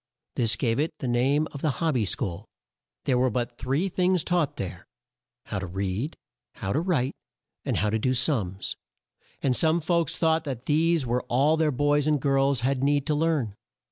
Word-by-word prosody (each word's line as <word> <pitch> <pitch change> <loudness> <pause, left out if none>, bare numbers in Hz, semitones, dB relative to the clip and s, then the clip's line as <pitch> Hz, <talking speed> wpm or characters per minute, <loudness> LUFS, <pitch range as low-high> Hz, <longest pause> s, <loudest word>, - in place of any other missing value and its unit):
This 115 -3 +2
gave 115 0 0
it 155 +1 -1
the 130 - -4
name 135 +6 +2
of 140 - -8
the 155 - +1
"Hob 165 -2 +1
by 120 -5 +1
School." 90 -2 -2 0.6
There 125 -2 +2
were 130 0 +3
but 120 +1 -3
three 135 +9 0
things 180 -1 +1
taught 175 -5 0
there: 95 - -6 0.6
How 100 - -3
to 95 - -4
read 95 - -3 0.4
How 95 - -3
to 150 - +2
write 150 -8 0 0.5
and - - 0
How 105 -1 +1
to 110 - +1
do 130 +3 +1
sums 105 - -1 0.7
and 130 -2 +2
some 160 +4 +3
folks 170 0 0
thought 160 -1 +2
that 130 -5 -5
these 160 0 +2
were 120 +1 0
all 140 +6 +3
their 160 -1 +2
boys 145 +2 +2
and 150 -1 +3
girls 135 -1 +2
had 130 +1 0
need 145 0 +2
to 150 - +1
learn. 150 -8 +1
135 Hz, 190 wpm, -26 LUFS, 120-155 Hz, 0.7 s, were